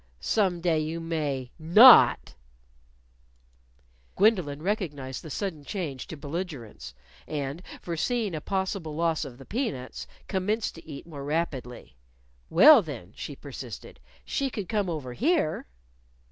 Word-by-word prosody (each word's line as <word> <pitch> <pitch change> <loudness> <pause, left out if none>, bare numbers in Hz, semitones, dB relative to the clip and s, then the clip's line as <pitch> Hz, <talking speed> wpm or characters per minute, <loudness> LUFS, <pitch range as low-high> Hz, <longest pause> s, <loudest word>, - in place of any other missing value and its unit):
"Some 185 - +1
day 165 -2 +2
you 155 +2 -3
may 150 -6 -3
not." 210 +11 +7 1.8
Gwendolyn 180 -9 +2
recognized 150 -10 -3
the 160 - -10
sudden 165 -3 -4
change 150 -7 -5
to 160 - -8
belligerence; 145 - -6 0.3
and 145 +2 -4 0.2
foreseeing 205 +5 -1
a 155 - -4
possible 190 -4 -3
loss 165 -1 0
of 125 -3 -10
the 135 - -13
peanuts, 195 - -4 0.2
commenced 210 +3 -1
to 165 - -14
eat 140 -3 -8
more 150 -4 -8
rapidly. 135 - -4 0.5
"Well, 265 - +8
then," 120 - -8
she 145 - -7
persisted, 130 -6 -9 0.3
"she 275 -1 -1
could 205 -7 -5
come 205 -4 -1
over 145 -7 -4
here." 285 - 0
160 Hz, 125 wpm, -27 LUFS, 140-190 Hz, 1.8 s, Well